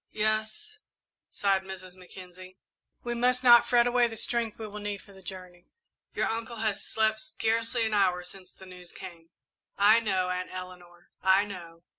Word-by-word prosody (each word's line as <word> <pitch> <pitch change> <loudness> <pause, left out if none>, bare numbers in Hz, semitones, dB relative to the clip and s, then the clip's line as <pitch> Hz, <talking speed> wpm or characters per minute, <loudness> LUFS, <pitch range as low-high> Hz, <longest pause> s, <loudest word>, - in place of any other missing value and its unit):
"Yes," 215 - -1 0.5
sighed 195 -1 +1
Mrs. 190 -1 -9
Mackenzie, 185 0 -13 0.5
"we 240 - -2
must 250 +1 +1
not 240 -1 +8
fret 240 -1 +4
away 245 0 +3
the 225 -1 -7
strength 230 -1 0
we 220 - -6
will 210 0 -8
need 205 -1 -4
for 200 - -17
the 190 - -15
journey. 180 -2 -10 0.5
Your - - +1
uncle 230 +1 -4
has 215 -2 -2
slept 220 0 0
scarcely 230 +2 -1
an 220 - -1
hour 185 -3 +2
since 185 +1 -9
the 190 - -14
news 180 -1 -12
came." 170 -3 -11 0.5
"I 210 +3 +6
know, 190 -5 0
Aunt 180 0 -3
Eleanor, 180 -1 -10
I 190 +1 +4
know." 170 -4 -10
200 Hz, 170 wpm, -28 LUFS, 185-225 Hz, 0.5 s, not